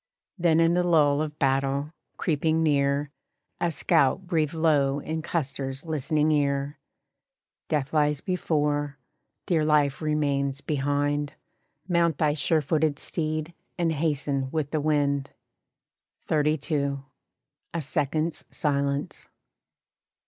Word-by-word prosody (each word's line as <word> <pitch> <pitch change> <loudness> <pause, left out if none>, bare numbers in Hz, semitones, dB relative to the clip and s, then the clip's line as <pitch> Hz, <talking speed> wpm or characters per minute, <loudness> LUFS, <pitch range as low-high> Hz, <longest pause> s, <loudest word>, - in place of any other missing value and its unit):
Then 170 -4 +3
in 165 0 +4
the 180 - +3
lull 150 -4 +3
of 150 -1 -4
battle, 135 +2 0 0.2
creeping 160 0 +1
near, 140 -1 +1 0.5
A 175 - +1
scout 140 +3 +2
breathed 160 -3 0
low 145 -4 +2
in 160 +2 -4
Custer's 135 -3 -3
listening 155 0 +1
ear: 140 -1 0 0.9
"Death 145 -2 -1
lies 150 -2 +2
before, 145 -5 -1 0.5
dear 165 -5 +2
life 150 -2 +2
remains 140 -3 0
behind 145 0 -1 0.5
Mount 170 -4 +2
thy 150 -2 +2
sure 155 +1 +1
footed 155 0 +1
steed, 155 +2 -3 0.2
and 170 -2 +1
hasten 145 -3 -1
with 150 -1 -2
the 155 - 0
wind." 145 -2 0 0.9
XXXII. 150 -2 0 0.8
A 170 - 0
second's 155 +2 -1
silence. 140 -1 -2
150 Hz, 110 wpm, -26 LUFS, 140-160 Hz, 0.9 s, in